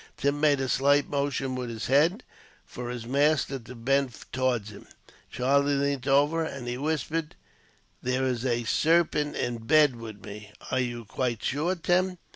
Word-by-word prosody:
Tim 140 +1 0
made 145 -2 +4
a 135 - -1
slight 140 +3 +3
motion, 140 -2 -1
with 125 -1 -4
his 115 -1 -5
head, 160 - +3 0.4
for 120 0 -7
his 120 -2 -5
master 140 +1 +1
to 125 +2 -11
bend 135 +1 0 0.2
towards 125 -5 0
him. 100 - -13 0.4
Charlie 140 +3 +2
leant 140 -1 -1
over 145 +4 +3
him, 160 - -4
and 125 -2 -7
he 120 - -2
whispered: 155 +3 -2 0.7
"There 125 +1 0
is 125 -2 -1
a 120 -2 0
sarpent 155 +2 +2
in 120 -1 -2
bed 145 +3 +4
with 110 -3 -9
me." 105 0 -10 0.2
"Are 130 - +1
you 120 -2 -3
quite 120 +1 -2
sure, 155 +7 0
Tim?" 180 +1 +1
135 Hz, 170 wpm, -27 LUFS, 120-145 Hz, 0.7 s, made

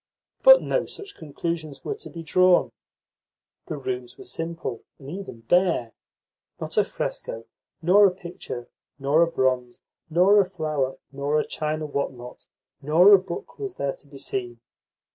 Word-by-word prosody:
But - - +8
no - - 0
such 405 -1 -9
conclusions 155 -1 -5
were - - -1
to 430 +1 -10
be 165 -1 -8
drawn. 180 +2 +4 1.0
The 155 - -4
rooms 125 -2 -5
were - - -10
simple, 165 -7 -4
and 140 +1 -10
even 185 -11 -7
bare. 170 -4 +2 0.7
Not - - -5
a - - +5
fresco 115 0 -5 0.4
nor 200 +4 +7
a - - +1
picture 170 -9 -8 0.3
nor 140 +4 +3
a 170 - +5
bronze 130 -5 0 0.3
nor 185 +6 +5
a 185 - -3
flower 145 -6 -2
nor 140 +2 0
a - - -1
china 155 0 -3
what 140 -2 -2
not 125 0 -12 0.3
nor 170 +8 +6
a 195 - +9
book 190 - -8
was 400 -3 -5
there 140 -1 -1
to - - -11
be 140 - -12
seen. 120 -3 -4
155 Hz, 160 wpm, -25 LUFS, 135-180 Hz, 1.0 s, a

